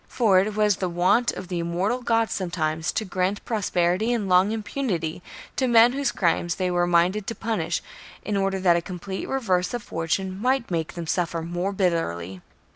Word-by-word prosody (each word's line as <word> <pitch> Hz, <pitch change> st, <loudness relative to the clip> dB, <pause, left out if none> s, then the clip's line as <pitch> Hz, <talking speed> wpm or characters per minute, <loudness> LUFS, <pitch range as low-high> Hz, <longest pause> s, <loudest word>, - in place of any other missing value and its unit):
For 210 Hz, -7 st, +3 dB
it 205 Hz, +2 st, -1 dB
was 210 Hz, -2 st, +3 dB
the 185 Hz, -, -2 dB
wont 180 Hz, +8 st, +2 dB
of 185 Hz, -, -7 dB
the 175 Hz, -1 st, -3 dB
immortal 180 Hz, +9 st, -1 dB
gods 230 Hz, -2 st, +1 dB
sometimes 160 Hz, -4 st, -1 dB
to 220 Hz, -, -1 dB
grant 190 Hz, +1 st, -2 dB
prosperity 195 Hz, -1 st, +1 dB
and 225 Hz, -5 st, -1 dB
long 185 Hz, +2 st, +4 dB
impunity 205 Hz, -, -3 dB, 0.4 s
to 260 Hz, -, +2 dB
men 235 Hz, 0 st, +6 dB
whose 275 Hz, -2 st, 0 dB
crimes 175 Hz, -1 st, 0 dB
they 185 Hz, -1 st, -1 dB
were 175 Hz, 0 st, +1 dB
minded 180 Hz, +4 st, +2 dB
to 230 Hz, -, -3 dB
punish 225 Hz, +1 st, -2 dB, 0.4 s
in 210 Hz, -, -1 dB
order 195 Hz, -1 st, 0 dB
that 175 Hz, -2 st, +5 dB
a 170 Hz, -, +1 dB
complete 185 Hz, +2 st, -6 dB
reverse 195 Hz, -7 st, 0 dB
of 240 Hz, -, -5 dB
fortune 185 Hz, +4 st, -2 dB
might 255 Hz, -3 st, +1 dB
make 165 Hz, -2 st, -2 dB
them 170 Hz, -1 st, -5 dB
suffer 165 Hz, -1 st, -1 dB
more 175 Hz, +3 st, -2 dB
bitterly. 95 Hz, -, -1 dB
185 Hz, 185 wpm, -24 LUFS, 175-215 Hz, 0.4 s, men